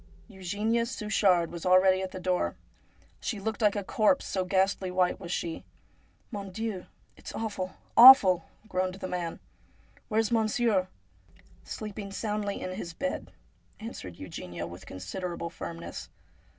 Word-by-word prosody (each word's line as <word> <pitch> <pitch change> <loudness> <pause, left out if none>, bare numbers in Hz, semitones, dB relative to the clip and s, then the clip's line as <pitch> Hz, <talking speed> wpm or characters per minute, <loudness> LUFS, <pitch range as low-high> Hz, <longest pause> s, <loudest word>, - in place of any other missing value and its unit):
Eugenia 205 +5 -1
Suchard 200 -7 +2
was 170 -1 -7
already 185 +1 +5
at 190 - -3
the 185 - -7
door. 180 0 0 0.6
She 215 - -3
looked 220 +3 -3
like 210 -1 +4
a 205 - -2
corpse, 225 +5 +2
so 190 - -1
ghastly 190 0 +1
white 180 +1 +1
was 175 -3 -7
she. 170 -2 -3 0.3
' - - -37
Mon 200 -2 -5
Dieu! 210 -1 -4 0.3
it's - - -9
awful, 200 -4 -3 0.2
awful! 210 -9 +9
' 220 - -25
groaned 185 -2 -1
the 190 -1 -5
man. 175 -2 -3 0.3
' - - -31
Where's 225 0 +1
monsieur? 220 -3 +2 0.4
' - - -27
'Sleeping 210 -2 -6
soundly 210 -1 -2
in 185 - -4
his 180 -3 -6
bed,' 275 0 -3 0.5
answered 95 - -8
Eugenia 90 -1 -6
with 85 +2 -10
considerable 170 - -5
firmness. 170 -1 -7
190 Hz, 150 wpm, -29 LUFS, 180-215 Hz, 0.6 s, awful